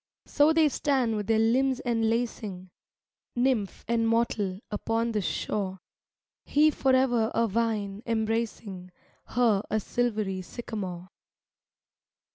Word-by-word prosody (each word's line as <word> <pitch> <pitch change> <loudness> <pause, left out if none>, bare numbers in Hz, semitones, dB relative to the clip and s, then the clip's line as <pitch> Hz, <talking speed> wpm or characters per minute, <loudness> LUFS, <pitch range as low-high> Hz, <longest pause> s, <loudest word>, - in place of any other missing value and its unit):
So 295 +1 +4
they 320 -1 +4
stand 265 -6 +1
with 210 -1 -3
their 225 -1 +3
limbs 255 +4 +2
enlacing, 225 -5 -1 0.6
Nymph 240 -5 0
and 230 0 +1
mortal, 220 -5 0
upon 225 +2 -1
this 210 -4 -1
shore, 190 -2 -2 0.6
He 305 +2 +4
forever 260 -5 +2
a 230 - +3
vine 210 -2 -1
embracing 220 -4 -2 0.4
Her 225 -5 +2
a 215 - +1
silvery 215 -4 -1
sycamore. 185 -3 -6
225 Hz, 105 wpm, -28 LUFS, 205-240 Hz, 0.6 s, So